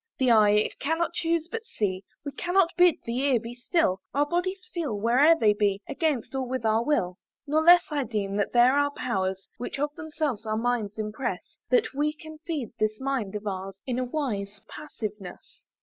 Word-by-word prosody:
"The 255 -2 +3
eye 215 -2 +6
it 210 +1 +1
cannot 325 +3 0
chuse 330 -1 0
but 455 +5 -5
see, 205 - -2 0.2
"We 285 - -3
cannot 355 +2 +1
bid 355 -2 +6
the 235 +2 -2
ear 270 -3 +3
be 230 +1 -8
still; 245 - 0
"Our 290 +1 +3
bodies 365 +5 -2
feel, 290 - -2
where'er 255 +9 +5
they 210 -1 +5
be, 205 -2 +1
"Against, 285 -6 -1
or 265 - -1
with 255 -2 -3
our 220 +1 +3
will. 190 -11 0 0.3
"Nor 305 +2 +2
less 350 +2 +7
I 290 -2 0
deem 210 -4 -2
that 205 - 0
there 245 +2 +5
are 285 0 +3
powers, 190 -8 -2
"Which 245 - -4
of 290 +1 -1
themselves 305 -8 -3
our 215 -1 -2
minds 225 -3 -1
impress, 215 +4 -4
"That 460 -2 +2
we 295 +2 0
can 315 0 -12
feed 295 -9 -3
this 215 0 0
mind 265 -7 -2
of 210 0 -5
ours, 195 -1 -5
"In 250 -1 -2
a - - 0
wise 215 -7 -3
passiveness. 210 -10 -8
255 Hz, 195 wpm, -27 LUFS, 210-310 Hz, 0.3 s, less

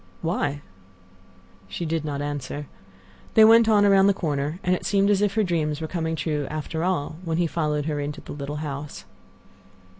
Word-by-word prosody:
"Why?" 145 -4 -1 1.1
She 95 - -5
did 160 -1 -1
not 145 -2 -3
answer. 145 0 -4 0.7
They 220 - +8
went 225 0 +6
on 205 -2 +5
around 195 -1 +5
the 200 - +3
corner, 150 0 -2
and 180 - +2
it 180 - -2
seemed 200 0 +2
as 200 -1 +2
if 205 -1 +1
her 220 - +3
dreams 155 -5 -1
were 160 - -3
coming 160 -1 -2
true 150 -3 -2
after 155 +1 -4
all, 165 -4 -1
when 165 -2 -2
he 175 - +2
followed 150 -3 -1
her 150 -2 -2
into 145 0 -4
the - - -10
little 145 0 -5
house. 145 0 -6
160 Hz, 185 wpm, -24 LUFS, 145-185 Hz, 1.1 s, They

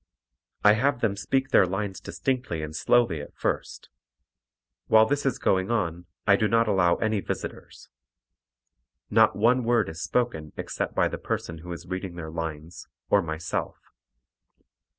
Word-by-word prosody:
I 105 - +7
have 125 +2 +1
them 105 -4 +1
speak 135 +6 -1
their 95 -8 +5
lines 95 +1 -3
distinctly 125 - -3
and 75 0 -6
slowly 95 -4 +2
at 75 - -11
first. - - -3 1.0
While 110 0 +6
this 145 +3 0
is 130 - 0
going 95 +1 +1
on 85 -7 -1 0.2
I 100 - +6
do 110 - +1
not 115 +1 +3
allow 90 -4 +3
any 110 -1 0
visitors. - - -6 1.2
Not - - +5
one 120 +4 +3
word 115 -4 +2
is 80 +1 -7
spoken 80 -4 -1
except - - -4
by - - +3
the - - -5
person 85 -1 -4
who 90 +2 -9
is 85 0 -7
reading 95 0 -5
the 80 -2 -6
lines, 80 +1 -6 0.2
or 100 - +5
myself. 80 0 -4
95 Hz, 150 wpm, -26 LUFS, 85-115 Hz, 1.2 s, I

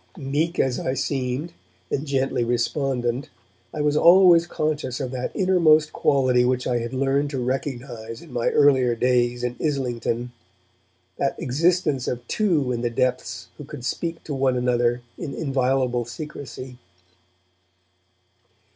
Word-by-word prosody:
Meek 155 +4 -1
as 130 -2 +1
I 130 - -2
seemed, 135 +4 -2 0.4
and 145 +2 -2
gently 135 -3 0
respondent, 125 +2 -1 0.4
I 150 - -3
was 150 0 +1
always 175 +1 +6
conscious 155 -6 -2
of 130 -3 -3
that 125 -1 -3
innermost 165 -5 +4
quality 130 -3 +3
which 125 0 0
I 120 -1 +1
had 120 0 -4
learned 135 +2 +1
to 135 -2 -3
recognize 125 -3 -4
in - - -14
my 120 -1 +1
earlier 130 -4 +4
days 120 0 +1
in 125 0 -2
Islington, 125 -4 -1 0.9
that 140 - -1
existence 150 0 +1
of 120 -1 -4
two 165 -12 +1
in 120 -1 -2
the 120 - 0
depths 125 +2 -2
who - - -6
could 125 - -9
speak 165 +6 -3
to 150 - -5
one 130 -2 +1
another 120 -1 +1 0.2
in 145 - -5
inviolable 130 -4 0
secrecy. 130 -1 -8
130 Hz, 140 wpm, -23 LUFS, 125-150 Hz, 0.9 s, always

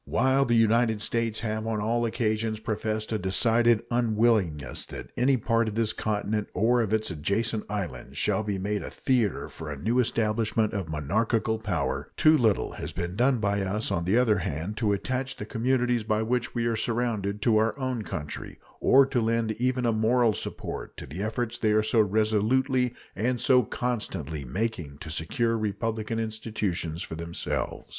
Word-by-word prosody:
While 130 +3 +2
the 120 -2 +2
United 115 0 +3
States 115 0 -1
have 110 0 -2
on 110 -1 -1
all 115 +3 +1
occasions 110 -1 -1
professed 110 0 -2
a 110 - 0
decided 115 +4 +3
unwillingness 110 - +1
that - - -8
any 130 +2 +3
part 115 0 +1
of 105 - -3
this 110 -1 +1
continent 105 0 -1
or 120 +5 +3
of 110 -3 -1
its 110 -2 +1
adjacent 105 +8 -1
islands 95 -12 -5
shall - - +1
be 105 -2 -2
made 100 +2 -2
a - - -6
theater 120 -7 0
for 80 -2 -8
a 75 - -5
new 115 - +1
establishment 110 -2 +1
of 95 -6 -3
monarchical 110 - 0
power, 90 -9 -2
too 155 0 +6
little 110 -8 +2
has - - -6
been 90 +1 -3
done 125 +4 +3
by 100 -2 0
us, 100 +3 -2
on 85 - -1
the 95 +6 +3
other 110 -5 +3
hand, 85 +5 -3
to 110 -3 +1
attach 130 +6 -2
the 105 - -6
communities 125 +1 +1
by 110 0 0
which 120 +1 -1
we 120 -1 0
are 115 -1 +1
surrounded 110 -3 -1
to 115 -3 +4
our 110 +4 +1
own 130 -3 -2
country, 75 -7 -6 0.2
or 135 +1 +6
to 130 -2 0
lend 115 0 +1
even 125 0 +1
a 115 - +2
moral 115 +1 +3
support - - -6
to - - -7
the 75 +8 -6
efforts 115 +3 -2
they 110 -1 +2
are 110 0 +3
so 110 +1 +2
resolutely 110 +5 +2 0.2
and 120 +4 0
so 125 +1 +5
constantly 95 - -3
making 80 - -3
to 80 +1 -8
secure 115 - 0
republican 110 +1 -2
institutions 105 -7 -2
for - - -7
themselves. 85 +1 -3
110 Hz, 180 wpm, -27 LUFS, 100-120 Hz, 0.2 s, too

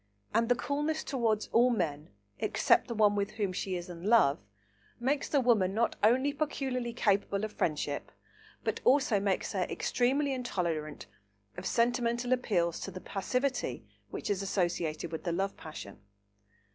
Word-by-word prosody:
And 230 +2 +2
the 245 - +5
coolness 295 +5 -1
towards 225 -6 0
all 245 +2 +5
men 160 -10 -1 0.3
except - - +3
the 235 - -4
one 210 -1 +4
with 200 -1 -1
whom 200 -4 -1
she 185 0 -2
is 175 -1 -5
in 175 -1 -9
love 210 -11 +5 0.6
makes 275 +4 0
a 285 - +4
woman 215 -7 +3
not 230 +1 +1
only 260 +6 +4
peculiarly 265 -5 -2
capable 200 -3 +1
of 215 - -3
friendship, 150 -2 -2 0.5
but - - -2
also 260 -6 +4
makes 195 -1 -1
her 185 -3 0
extremely 275 +3 +1
intolerant 170 - -3 0.5
of 180 +1 -5
sentimental 240 +2 +1
appeals 175 -9 0
to - - -5
the 185 -1 -7
passivity 250 +9 -2 0.2
which - - -3
is 195 -1 0
associated 175 -4 -1
with 160 - -5
the 175 - -1
love 195 +3 -1
passion. 155 -10 -9
210 Hz, 155 wpm, -31 LUFS, 180-250 Hz, 0.6 s, the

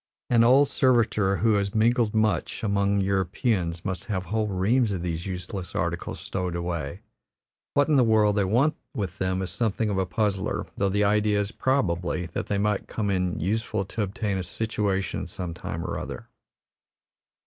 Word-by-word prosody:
An 115 -1 +6
old 135 +4 +6
servitor 110 -8 +2
who 110 0 +3
has 100 0 0
mingled 115 0 +3
much 110 -5 0
among 100 -1 +2
Europeans 95 - 0
must 95 -3 -3
have 95 -4 -2
whole 110 +4 0
reams 105 +5 +2
of 90 -3 -3
these 85 0 -3
useless 90 -1 -6
articles - - -2
stowed 90 -2 -3
away. 85 -5 -3 0.7
What 145 - +4
in 150 -2 +4
the 130 - +6
world 110 -2 +4
they 105 - +2
want 120 +11 +2 0.2
with 95 -7 -4
them 95 0 0
is 95 - -5
something 110 -2 0
of 95 - 0
a 95 - 0
puzzler; 95 +2 -1
though 100 - +1
the 105 +2 +1
idea 105 0 +3
is, 100 0 -2
probably, 90 -11 0
that - - -3
they 100 - 0
might 105 0 0
come 105 -2 -2
in 90 -3 0
useful 110 +2 -1
to 110 +3 -4
obtain 100 0 -2
a - - -2
situation 100 0 -2
some 90 -2 -5
time 85 0 -5
or 85 - -3
other. - - -7
100 Hz, 175 wpm, -26 LUFS, 95-110 Hz, 0.7 s, An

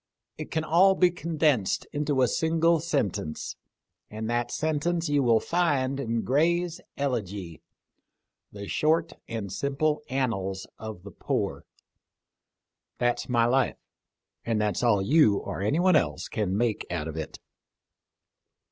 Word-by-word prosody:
It - - -7
can 160 - -1
all 185 +5 +5
be 180 -1 +4
condensed 155 - 0
into 145 -3 +1
a - - +4
single 165 +3 +2
sentence, 135 - -2 0.5
and 110 +1 -5
that 120 0 0
sentence 160 +2 -1
you 145 -1 +3
will 115 -3 +4
find 140 -6 0
in 115 -3 -1
Gray's 170 +5 +1 0.2
Elegy, 100 - -3 0.5
' - - -57
The 100 -1 -8
short 160 +2 +1
and 105 -5 -5
simple 150 +5 0
annals 95 -8 -2
of 110 -5 -7
the 100 - -9
poor.' - - -3 1.3
That's 120 0 0
my 120 -2 +3
life, 130 +2 +2 0.7
and 115 -2 0
that's 105 -1 0
all 110 -5 +3
you 125 -4 +4
or - - -5
anyone 165 - +3
else 75 - +1
can 100 -3 -1
make 115 -2 0
out 85 -3 -3
of 80 - -6
it." 80 -2 -5
130 Hz, 135 wpm, -27 LUFS, 105-155 Hz, 1.3 s, all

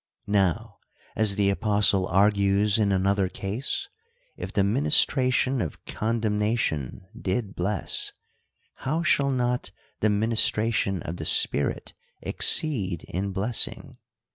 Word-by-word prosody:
Now, 100 +2 -1 0.4
as 105 -2 +2
the 100 -1 +2
apostle 100 -2 +2
argues 100 +2 +2
in 100 -2 +1
another 95 0 +1
case, 110 - -3 0.5
if - - -7
the 100 - +1
ministration 130 +1 +2
of 80 - -6
condemnation 105 - -2
did 100 -1 -3
bless, 95 +3 -2 0.7
how 155 +5 -2
shall 140 -4 +2
not 125 -2 -1 0.3
the 110 - +2
ministration 105 -2 +1
of 85 +2 -6
the - - -6
Spirit 70 - +1 0.3
exceed 100 - +2
in 95 +3 -3
blessing 105 +5 -2
105 Hz, 110 wpm, -25 LUFS, 95-115 Hz, 0.7 s, as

